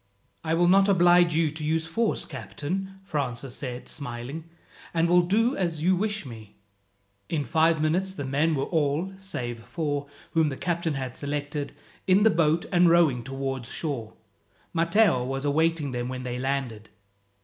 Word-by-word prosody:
"I 160 Hz, 0 st, 0 dB
will 175 Hz, +1 st, +3 dB
not 195 Hz, +2 st, +5 dB
oblige 175 Hz, -2 st, +5 dB
you 160 Hz, -2 st, +2 dB
to 155 Hz, 0 st, -7 dB
use 160 Hz, +1 st, 0 dB
force, 220 Hz, +7 st, -1 dB
captain," 190 Hz, +5 st, -5 dB
Francis 135 Hz, -8 st, -3 dB
said, 125 Hz, -3 st, -6 dB
smiling, 140 Hz, +3 st, -6 dB, 0.5 s
"and 165 Hz, 0 st, +3 dB
will 175 Hz, +1 st, +5 dB
do 225 Hz, +8 st, +2 dB
as 165 Hz, -5 st, -1 dB
you 185 Hz, +2 st, +4 dB
wish 210 Hz, 0 st, -2 dB
me." 110 Hz, -4 st, -11 dB, 0.7 s
In 150 Hz, -3 st, -1 dB
five 160 Hz, +5 st, +3 dB
minutes 180 Hz, +5 st, 0 dB
the 140 Hz, -, -4 dB
men 150 Hz, +4 st, +1 dB
were 135 Hz, -, 0 dB
all 160 Hz, +4 st, 0 dB
save 120 Hz, -11 st, -5 dB
four, 145 Hz, -1 st, -3 dB, 0.2 s
whom 160 Hz, -2 st, +3 dB
the 135 Hz, -, -5 dB
captain 170 Hz, -3 st, -1 dB
had 130 Hz, -2 st, -4 dB
selected 145 Hz, 0 st, -4 dB, 0.3 s
in 190 Hz, +2 st, +5 dB
the 220 Hz, -, +6 dB
boat, 165 Hz, -1 st, +2 dB
and 175 Hz, -2 st, +5 dB
rowing 165 Hz, -8 st, +4 dB
towards 135 Hz, -1 st, -4 dB
shore. 130 Hz, -9 st, -4 dB, 0.6 s
Matteo 170 Hz, -, +3 dB
was 135 Hz, +2 st, -3 dB
awaiting 155 Hz, 0 st, +1 dB
them 120 Hz, 0 st, -3 dB
when 130 Hz, 0 st, -5 dB
they 125 Hz, -1 st, -4 dB
landed. 130 Hz, -5 st, -3 dB
155 Hz, 160 wpm, -26 LUFS, 135-175 Hz, 0.7 s, the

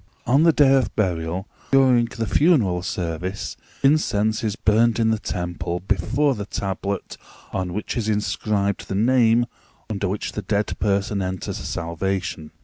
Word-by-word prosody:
On 130 Hz, +4 st, +4 dB
the 165 Hz, 0 st, +6 dB
day 145 Hz, -3 st, +5 dB
of 135 Hz, -2 st, +1 dB
burial, 90 Hz, -1 st, -1 dB, 0.2 s
during 130 Hz, -3 st, +5 dB
the 115 Hz, 0 st, -4 dB
funeral 110 Hz, -, +3 dB
service, 90 Hz, +1 st, -4 dB, 0.3 s
incense 110 Hz, -8 st, +2 dB
is 110 Hz, -2 st, -1 dB
burned 115 Hz, +1 st, +3 dB
in 110 Hz, -1 st, +2 dB
the 110 Hz, -, 0 dB
temple 90 Hz, -1 st, -3 dB
before 105 Hz, -, +1 dB
the 105 Hz, -4 st, -6 dB
tablet 100 Hz, 0 st, -3 dB, 0.4 s
on 95 Hz, -2 st, -2 dB
which 105 Hz, +4 st, -4 dB
is 110 Hz, -3 st, -1 dB
inscribed 105 Hz, -1 st, -1 dB
the 95 Hz, -, -3 dB
name 120 Hz, +1 st, +4 dB, 0.5 s
under 100 Hz, -1 st, -1 dB
which 100 Hz, +3 st, -3 dB
the 105 Hz, -, -4 dB
dead 105 Hz, 0 st, -1 dB
person 100 Hz, 0 st, 0 dB
enters 95 Hz, 0 st, -3 dB
salvation. 85 Hz, -1 st, -3 dB
105 Hz, 145 wpm, -23 LUFS, 95-115 Hz, 0.5 s, the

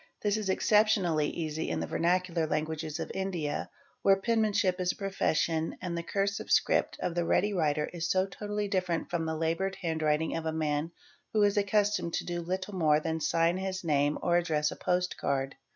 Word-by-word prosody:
This 205 Hz, -1 st, +2 dB
is 215 Hz, -3 st, -2 dB
exceptionally 190 Hz, -7 st, +3 dB
easy 160 Hz, -1 st, -3 dB
in -, -, -1 dB
the -, -, -2 dB
Ver -, -, -4 dB
nacular 170 Hz, -2 st, +1 dB
languages 155 Hz, +1 st, -2 dB
of -, -, -4 dB
India, 175 Hz, -6 st, -2 dB, 0.3 s
where 195 Hz, -, +5 dB
penmanship 205 Hz, -3 st, +1 dB
is 180 Hz, 0 st, +2 dB
a -, -, -10 dB
profession 165 Hz, -4 st, 0 dB
and 175 Hz, -2 st, -4 dB
the 170 Hz, -, -2 dB
i 170 Hz, -, -11 dB
cursive 200 Hz, 0 st, -1 dB
script -, -, +2 dB
of 175 Hz, -, -1 dB
the 175 Hz, 0 st, 0 dB
ready 205 Hz, +4 st, +2 dB
writer 150 Hz, -4 st, +1 dB
is 170 Hz, -1 st, -3 dB
so 185 Hz, +1 st, +3 dB
totally 205 Hz, +1 st, -4 dB
distinct 185 Hz, -4 st, -1 dB
from 165 Hz, -2 st, -1 dB
the 160 Hz, 0 st, -2 dB
laboured 165 Hz, +4 st, -1 dB
handwriting 160 Hz, -1 st, 0 dB
of 165 Hz, -, -3 dB
the 160 Hz, -, 0 dB
man 155 Hz, 0 st, -1 dB, 0.4 s
who 215 Hz, -1 st, +4 dB
is 205 Hz, -1 st, +3 dB
accustomed 205 Hz, -3 st, +1 dB
to -, -, -1 dB
do 175 Hz, -1 st, -3 dB
little 185 Hz, +4 st, -3 dB
more 155 Hz, -5 st, +3 dB
than 160 Hz, +1 st, -2 dB
sign 165 Hz, +3 st, +2 dB
his 190 Hz, 0 st, -3 dB
name 145 Hz, -2 st, +2 dB
or 175 Hz, 0 st, +3 dB
address 155 Hz, -3 st, +1 dB
a -, -, -6 dB
post 180 Hz, 0 st, -1 dB
card. 135 Hz, -1 st, -1 dB
175 Hz, 200 wpm, -30 LUFS, 160-195 Hz, 0.4 s, where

